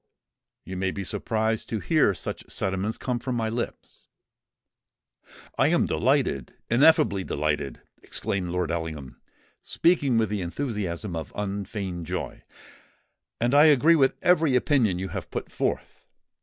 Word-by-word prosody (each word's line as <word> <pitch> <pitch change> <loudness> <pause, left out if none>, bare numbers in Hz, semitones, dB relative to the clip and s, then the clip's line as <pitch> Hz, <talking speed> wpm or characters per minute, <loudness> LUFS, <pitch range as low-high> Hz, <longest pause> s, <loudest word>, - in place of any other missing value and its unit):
You 95 0 -6
may 95 0 0
be 100 +1 -4
surprised 110 +3 -1
to 110 - -1
hear 155 - +2
such - - -6
sentiments 95 +3 -2
come 125 -2 -2
from 125 +1 -3
my 115 -2 -1
lips——" 115 +1 -6 1.5
"I - - +5
am - - +3
delighted—ineffably 120 - +2
delighted!" 75 -2 -2 0.2
exclaimed 95 -3 -3
Lord 90 -2 -1
Ellingham, 80 -5 -5 0.4
speaking 145 -8 +2
with 110 -2 +2
the 105 -2 -2
enthusiasm 95 - -3
of 80 -1 -5
unfeigned 100 -4 -4
joy; 90 +1 -4 1.0
"and 120 +3 +1
I 145 +2 +7
agree 155 +2 +6
with 135 -4 +3
every 160 -6 +4
opinion 125 - +2
you 95 +1 -4
have - - -6
put - - -5
forth. - - -3
105 Hz, 130 wpm, -26 LUFS, 90-130 Hz, 1.5 s, I